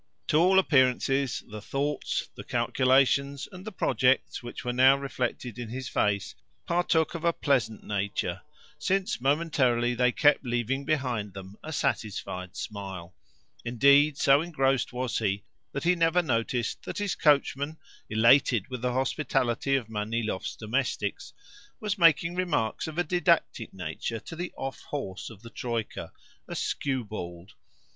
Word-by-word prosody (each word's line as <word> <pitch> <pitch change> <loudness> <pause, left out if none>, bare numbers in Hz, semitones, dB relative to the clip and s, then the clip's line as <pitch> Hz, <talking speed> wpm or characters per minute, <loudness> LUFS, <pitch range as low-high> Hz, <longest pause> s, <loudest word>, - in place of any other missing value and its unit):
To 150 - +4
all 185 +4 +5
appearances 135 - +2
the 105 0 -8
thoughts, 140 +6 -2
the - - -9
calculations, 140 +1 +2
and 185 -1 -10
the 220 - -6
projects 130 - +1
which 120 0 -8
were 125 - -1
now 130 +2 +6
reflected 125 -3 -4
in 120 -2 -5
his 130 +2 -5
face 100 -2 0 0.3
partook 170 -2 +1
of 170 -1 -6
a 170 - +4
pleasant 130 -9 0
nature, 100 -1 -2 0.4
since 190 -10 0
momentarily 130 -5 +2
they 125 +1 +3
kept 145 +2 +3
leaving 125 +2 -1
behind 125 -10 -1
them 95 +1 -9
a 160 - -6
satisfied 95 - -2
smile. 95 -4 -6 0.5
Indeed, 140 +5 +4
so 140 +2 +5
engrossed 135 -6 0
was 125 -1 -2
he 100 -2 -1 0.3
that 140 - -4
he 175 +2 +4
never 170 +1 +2
noticed 120 -4 -1
that - - -6
his 205 -2 -1
coachman, 145 0 +2 0.3
elated 115 0 +4
with 125 -2 -5
the 125 0 0
hospitality 135 -1 0
of 125 -5 -1
Manilov's 110 -1 -3
domestics, 110 -3 -2 0.5
was 210 -1 -2
making 170 0 +5
remarks 175 -12 -1
of 160 0 -7
a 175 - +3
didactic 170 -8 +1
nature 95 +4 -4
to - - -9
the 175 +2 -4
off 135 0 -5
horse 100 -10 -5
of 115 -2 -14
the 115 - -11
troika, 115 -4 -4 0.4
a - - -6
skewbald. 105 -9 -3
130 Hz, 145 wpm, -28 LUFS, 115-150 Hz, 0.5 s, now